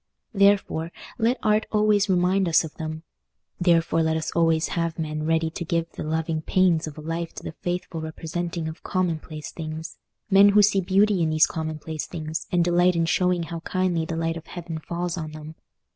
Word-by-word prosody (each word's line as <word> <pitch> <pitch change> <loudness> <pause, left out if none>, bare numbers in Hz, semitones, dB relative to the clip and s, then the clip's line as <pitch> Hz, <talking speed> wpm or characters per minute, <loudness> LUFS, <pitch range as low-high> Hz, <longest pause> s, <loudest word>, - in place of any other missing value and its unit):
Therefore, 200 -5 +2 0.3
let 235 +3 +2
Art 215 0 +2
always 210 -1 +3
remind 185 0 +2
us 165 - +4
of 160 - -7
them; 155 0 -6 0.6
therefore 165 -2 +3
let 160 0 +1
us 160 0 -3
always 165 -1 +2
have 165 -1 -2
men 155 -1 -3
ready 160 0 +1
to 170 - -5
give 165 0 -1
the - - -8
loving 160 +1 -1
pains 170 -2 +2
of 155 - -8
a - - -7
life 165 +2 -4
to - - -8
the - - -5
faithful 175 0 -4
representing 165 +1 -4
of 160 +1 -7
commonplace 160 -5 -3
things—men 165 +5 +1
who 205 +1 +5
see 195 -1 +3
beauty 195 +1 +3
in 160 - +2
these 155 0 +5
commonplace 155 -1 -5
things, 160 -1 -5
and 175 -1 +3
delight 175 +1 +3
in 165 0 +2
showing 180 +1 +1
how 165 +1 -5
kindly 180 -1 0
the 165 0 -4
light 165 0 -1
of 165 - -11
heaven 170 -2 -6
falls 175 +2 -3
on 155 -1 -6
them. 155 0 -9
165 Hz, 190 wpm, -25 LUFS, 160-180 Hz, 0.6 s, who